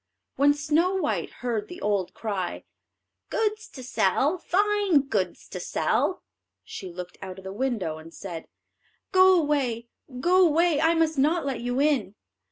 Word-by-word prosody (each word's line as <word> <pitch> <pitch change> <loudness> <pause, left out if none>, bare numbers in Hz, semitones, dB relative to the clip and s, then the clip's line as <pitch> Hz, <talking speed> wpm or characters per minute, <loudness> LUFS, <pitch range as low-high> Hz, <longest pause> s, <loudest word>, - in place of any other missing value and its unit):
When 285 +2 +4
Snow 315 +6 +1
white 380 - -1
heard 230 -4 -3
the 355 - -9
old 200 -3 -1
cry, 200 -5 -3 0.7
"Goods 430 0 -1
to 260 - -11
sell, 260 - +1
fine 405 -3 +2
goods 205 -9 -2
to - - -6
sell," - - 0 0.4
she 185 - -8
looked 180 0 -8
out 190 -1 -7
of 190 - -11
the 190 0 -6
window 210 -10 -2
and 160 +1 -12
said: 170 -2 -8 0.6
"Go 375 -1 +6
away, 260 -7 -1 0.3
go 365 +6 +4
away; 330 -2 +3
I 330 +1 +4
must 320 -3 +1
not 315 +3 +2
let 260 -4 -2
you 245 +2 -1
in." 275 -9 +1
275 Hz, 155 wpm, -26 LUFS, 205-335 Hz, 0.7 s, Go